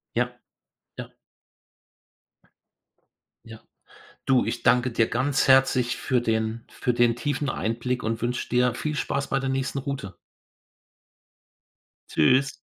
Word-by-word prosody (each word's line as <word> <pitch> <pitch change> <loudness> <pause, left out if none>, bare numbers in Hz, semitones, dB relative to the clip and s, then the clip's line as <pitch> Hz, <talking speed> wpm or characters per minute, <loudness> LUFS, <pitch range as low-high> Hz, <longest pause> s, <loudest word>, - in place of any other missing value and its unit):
Ja, 125 +1 -1 0.6
ja. - - -8 2.3
Ja. 110 -1 -12 0.7
Du, 130 -2 +3
ich 120 - -3
danke 125 +1 +3
dir 115 -1 +2
ganz 135 +4 0
herzlich 130 -2 +4
für 125 -2 0
den 110 0 -2
für 125 - -2
den 120 -1 +3
tiefen 145 +2 -2
Einblick 120 +3 -2
und 110 +1 -2
wünsche 120 +1 -2
dir 125 0 +2
viel 150 +4 -3
Spaß 140 -1 -2
bei 135 - +1
der 135 0 -2
nächsten 135 +1 -2
Route. 130 -8 -5 2.0
Tschüss. 130 - +2
125 Hz, 120 wpm, -25 LUFS, 115-135 Hz, 2.3 s, herzlich